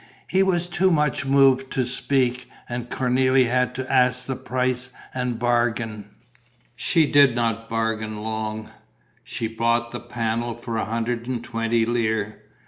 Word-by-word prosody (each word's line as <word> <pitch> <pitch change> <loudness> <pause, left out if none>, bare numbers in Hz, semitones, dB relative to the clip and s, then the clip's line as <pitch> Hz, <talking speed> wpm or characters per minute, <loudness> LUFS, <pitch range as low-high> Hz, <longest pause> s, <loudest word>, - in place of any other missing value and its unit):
He 190 - +2
was 180 -2 +2
too 185 +2 +2
much 150 -5 +1
moved 135 -1 +4
to 130 - +1
speak; 125 0 0 0.2
and 120 0 -5
Cornélie 130 +1 +2
had 125 +1 +1
to 130 +1 -4
ask 125 -1 +3
the 130 - -3
price 125 0 -2 0.2
and 125 -2 -2
bargain. 115 -3 0 0.7
She 160 +4 +3
did 140 -4 +5
not 115 -1 -1
bargain 110 -1 -2
long: 110 0 -4 0.5
she 115 - -3
bought 115 +1 0
the 120 - -5
panel 120 0 -2
for 120 0 -6
a - - -1
hundred 115 +2 -2
and 125 -2 -3
twenty 115 -1 0
lire. 110 -3 -1
120 Hz, 145 wpm, -23 LUFS, 115-130 Hz, 0.7 s, did